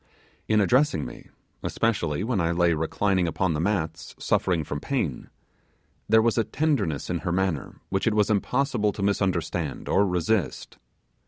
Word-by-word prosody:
In 110 Hz, -1 st, +3 dB
addressing 120 Hz, -, +3 dB
me -, -, -10 dB, 0.3 s
especially 95 Hz, -8 st, 0 dB
when 110 Hz, -4 st, 0 dB
I 85 Hz, 0 st, +1 dB
lay 85 Hz, 0 st, +3 dB
reclining 90 Hz, +3 st, 0 dB
upon 90 Hz, +1 st, 0 dB
the 75 Hz, -, -2 dB
mats 80 Hz, -4 st, -2 dB
suffering 85 Hz, -3 st, +1 dB
from 75 Hz, -1 st, -4 dB
pain 90 Hz, -, -2 dB, 0.8 s
there 110 Hz, 0 st, +6 dB
was 115 Hz, 0 st, +2 dB
a -, -, +3 dB
tenderness 115 Hz, -, -1 dB
in -, -, -1 dB
her -, -, -3 dB
manner 90 Hz, -5 st, -1 dB
which 95 Hz, +4 st, 0 dB
it 110 Hz, -, +2 dB
was 105 Hz, 0 st, +3 dB
impossible 120 Hz, +1 st, +1 dB
to 100 Hz, -, -4 dB
misunderstand 90 Hz, -6 st, -1 dB
or 100 Hz, +1 st, +3 dB
resist. 90 Hz, +2 st, -1 dB
95 Hz, 155 wpm, -26 LUFS, 85-110 Hz, 0.8 s, there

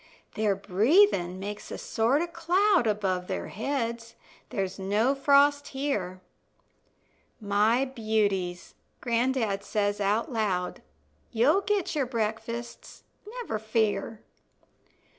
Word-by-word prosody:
Their 210 Hz, -2 st, +1 dB
breathin' 200 Hz, -, +3 dB
makes 205 Hz, +2 st, -6 dB
a -, -, -5 dB
sort 245 Hz, +8 st, +1 dB
of 340 Hz, -1 st, -7 dB
cloud 355 Hz, -, +2 dB
Above 190 Hz, -4 st, -1 dB
their 190 Hz, -, -4 dB
heads 230 Hz, 0 st, -3 dB, 0.3 s
there's 195 Hz, -5 st, -3 dB
no 210 Hz, +7 st, +1 dB
frost 285 Hz, +1 st, +3 dB
here. 210 Hz, -10 st, -3 dB, 1.2 s
"My 215 Hz, +4 st, +2 dB
beauties," 210 Hz, -7 st, -1 dB, 0.3 s
gran'dad 235 Hz, -4 st, 0 dB
says 205 Hz, 0 st, -1 dB
out 210 Hz, +6 st, 0 dB
loud, 195 Hz, -6 st, -1 dB, 0.5 s
"You'll 265 Hz, -, +3 dB
get 410 Hz, -2 st, -1 dB
your 285 Hz, -5 st, 0 dB
breakfasts, 230 Hz, 0 st, -4 dB, 0.2 s
never 455 Hz, -, -4 dB
fear." 220 Hz, 0 st, -1 dB
225 Hz, 105 wpm, -27 LUFS, 205-275 Hz, 1.2 s, breathin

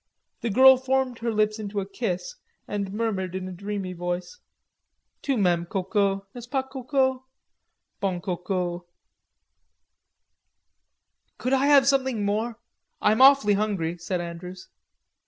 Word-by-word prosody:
The 235 Hz, -, -1 dB
girl 260 Hz, +5 st, +7 dB
formed 260 Hz, -1 st, -1 dB
her 230 Hz, 0 st, -1 dB
lips 215 Hz, 0 st, +1 dB
into 205 Hz, -1 st, -3 dB
a 195 Hz, -, -3 dB
kiss, 200 Hz, -, -3 dB, 0.3 s
and 200 Hz, -2 st, -3 dB
murmured 200 Hz, -4 st, -2 dB
in 185 Hz, 0 st, -4 dB
a -, -, -6 dB
drowsy 195 Hz, 0 st, -5 dB
voice: 175 Hz, -, -4 dB, 0.8 s
"Tu 275 Hz, -3 st, 0 dB
m'aimes, 175 Hz, -4 st, +1 dB
Coco, 195 Hz, 0 st, 0 dB
n'est 245 Hz, -, -8 dB
ce -, -, -26 dB
pas, 265 Hz, 0 st, 0 dB
Coco? 260 Hz, 0 st, -1 dB, 0.7 s
Bon 185 Hz, -3 st, -1 dB
Coco." 180 Hz, 0 st, -3 dB, 2.5 s
"Could 255 Hz, -, -1 dB
I 270 Hz, +1 st, +3 dB
have 280 Hz, -2 st, +6 dB
something 265 Hz, -6 st, +1 dB
more, 220 Hz, +3 st, -1 dB, 0.4 s
I'm 215 Hz, +4 st, +3 dB
awfully 270 Hz, -6 st, +7 dB
hungry," 195 Hz, -5 st, -1 dB
said 180 Hz, +2 st, -2 dB
Andrews. 175 Hz, +2 st, -8 dB
205 Hz, 130 wpm, -25 LUFS, 185-255 Hz, 2.5 s, girl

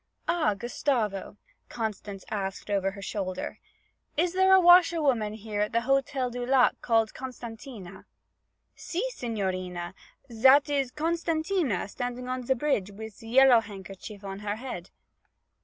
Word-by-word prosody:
'Ah, 310 Hz, -12 st, +2 dB
Gustavo,' 220 Hz, -3 st, -2 dB, 0.3 s
Constance 210 Hz, -3 st, -5 dB
asked 195 Hz, -1 st, -4 dB
over 195 Hz, -1 st, +1 dB
her 200 Hz, 0 st, -9 dB
shoulder, 185 Hz, -2 st, -4 dB, 0.6 s
'is 340 Hz, +2 st, +2 dB
there 380 Hz, +1 st, +4 dB
a 380 Hz, -, +8 dB
washer 350 Hz, -1 st, +7 dB
woman 235 Hz, -8 st, +1 dB
here 215 Hz, -1 st, -4 dB
at 210 Hz, -, -1 dB
the 230 Hz, -, +2 dB
Hotel 270 Hz, 0 st, 0 dB
du 245 Hz, 0 st, -4 dB
Lac 255 Hz, 0 st, +4 dB, 0.2 s
named 225 Hz, -1 st, +3 dB
Costantina?' 230 Hz, -6 st, -9 dB, 0.7 s
'Si, 360 Hz, +6 st, -3 dB
signorina, 185 Hz, -, -3 dB, 0.4 s
zat 265 Hz, +6 st, +6 dB
is 275 Hz, -3 st, +1 dB
Costantina 320 Hz, -, -1 dB
standing 245 Hz, +3 st, -5 dB
on 255 Hz, 0 st, -3 dB
ze 265 Hz, -, +3 dB
bridge 245 Hz, -8 st, 0 dB
wif 220 Hz, +2 st, -9 dB
ze 225 Hz, +3 st, -14 dB
yellow 260 Hz, 0 st, +7 dB
handkerchief 200 Hz, -1 st, -9 dB
on 195 Hz, 0 st, -6 dB
her 205 Hz, 0 st, -3 dB
head.' 220 Hz, -7 st, -7 dB
230 Hz, 140 wpm, -28 LUFS, 205-270 Hz, 0.7 s, a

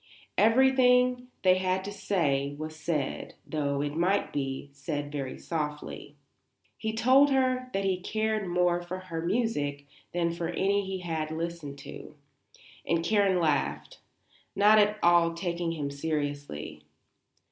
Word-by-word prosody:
Everything 250 Hz, +1 st, +4 dB, 0.2 s
they 185 Hz, -1 st, +5 dB
had 185 Hz, 0 st, 0 dB
to 200 Hz, -, -5 dB
say 145 Hz, -9 st, 0 dB
was 155 Hz, +1 st, -6 dB
said, 150 Hz, -3 st, -3 dB
though, 140 Hz, -2 st, -1 dB
it 145 Hz, 0 st, -3 dB
might 185 Hz, +5 st, +1 dB
be, 135 Hz, 0 st, -3 dB
said 145 Hz, +1 st, -4 dB
very 135 Hz, -3 st, -4 dB
softly. 150 Hz, -2 st, -5 dB, 0.6 s
He 220 Hz, 0 st, -3 dB
told 260 Hz, +5 st, +5 dB
her 255 Hz, -1 st, +1 dB
that 195 Hz, -3 st, -1 dB
he 190 Hz, -2 st, +1 dB
cared 215 Hz, 0 st, -1 dB
more 175 Hz, 0 st, +2 dB
for 175 Hz, +1 st, -5 dB
her 175 Hz, -3 st, -5 dB
music 165 Hz, -8 st, -1 dB, 0.3 s
than 170 Hz, -1 st, 0 dB
for 170 Hz, -1 st, -3 dB
any 195 Hz, +4 st, +1 dB
he 190 Hz, -1 st, -4 dB
had 160 Hz, -3 st, -3 dB
listened 160 Hz, -3 st, -5 dB
to, 150 Hz, -, -10 dB, 0.7 s
and 165 Hz, 0 st, 0 dB
Karen 200 Hz, -2 st, +3 dB
laughed, 150 Hz, -5 st, -1 dB, 0.6 s
not 210 Hz, +2 st, +6 dB
at 210 Hz, 0 st, +3 dB
all 170 Hz, -1 st, +4 dB
taking 170 Hz, -1 st, -2 dB
him 145 Hz, -3 st, -3 dB
seriously. 145 Hz, -, -4 dB
175 Hz, 135 wpm, -28 LUFS, 150-205 Hz, 0.7 s, not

